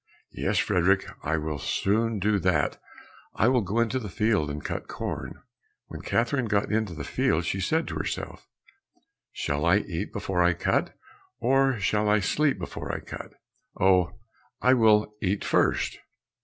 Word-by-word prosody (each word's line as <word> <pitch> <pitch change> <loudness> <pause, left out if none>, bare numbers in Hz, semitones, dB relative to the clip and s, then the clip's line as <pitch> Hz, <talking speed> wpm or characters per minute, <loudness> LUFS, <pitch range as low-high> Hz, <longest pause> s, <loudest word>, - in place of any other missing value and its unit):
"Yes, - - -1
Frederick, - - +2 0.2
I 80 +2 0
will 75 -1 -3
soon 110 - 0
do 105 +1 +1
that, 90 -6 +1 0.5
I 110 - +3
will 125 -2 +3
go 105 +3 -1
into 115 +2 +1
the 105 -5 -6
field 105 -4 +1
and 75 +1 -6
cut - - -4
corn." - - -5 0.5
When - - -7
Catherine 120 +1 0
got 105 -1 0
into 105 -5 0
the 75 - -5
field, 80 +3 0
she 95 +3 -1
said 160 - 0
to - - -4
herself, - - -5 0.8
"Shall 70 +1 -2
I 85 +4 +5
eat 90 -5 -4
before 90 -2 -1
I 90 0 +4
cut, 85 - -1 0.4
or 135 0 +2
shall 105 +2 +1
I 105 +1 +4
sleep 140 +7 +1
before 85 - -5
I - - -3
cut? - - -9 0.5
Oh, 95 0 +3 0.4
I 130 - +4
will 110 -3 +4
eat 100 0 -1
first." - - +1
105 Hz, 160 wpm, -26 LUFS, 90-115 Hz, 0.8 s, I